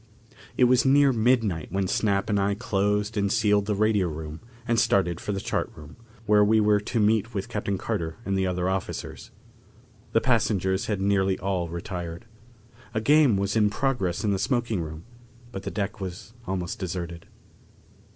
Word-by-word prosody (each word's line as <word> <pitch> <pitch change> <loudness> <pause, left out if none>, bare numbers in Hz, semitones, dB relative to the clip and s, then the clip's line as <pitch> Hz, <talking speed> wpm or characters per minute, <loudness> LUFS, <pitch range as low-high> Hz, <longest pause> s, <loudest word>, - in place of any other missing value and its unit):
It - - +4
was 125 0 +5
near 140 0 +5
midnight 110 - +1
when 95 +1 0
Snap 100 0 +1
and 105 -2 +1
I 100 +1 +1
closed 105 -1 0
and 100 -1 +1
sealed 105 -2 +2
the 105 - 0
radio 105 -2 +2
room 80 0 -6 0.3
and 115 -1 +2
started 90 -6 +2
for - - -4
the 100 - -2
chart - - -2
room, 75 0 -12 0.3
where 105 -1 +5
we 110 +2 +4
were 105 -1 +4
to 110 +3 -2
meet 110 +1 +2
with 95 - -2
Captain 100 -1 -2
Carter 85 -7 -3
and 100 - -1
the 95 -1 +1
other 90 0 -1
officers. 95 -1 -4 0.8
The - - +5
passengers 100 -6 +1
had 105 -3 -1
nearly 95 -1 +2
all 90 -3 -2
retired. 85 0 -6 0.7
A - - +2
game 140 -2 +4
was 100 +1 -1
in 105 -2 +4
progress 105 -8 -1
in 105 - +1
the 95 - 0
smoking 120 -5 0
room, 80 0 -7 0.5
but 95 - -6
the - - -4
deck 100 -1 -4
was 95 +4 -7
almost 90 -2 -3
deserted. 85 -2 -5
100 Hz, 175 wpm, -26 LUFS, 95-110 Hz, 0.8 s, was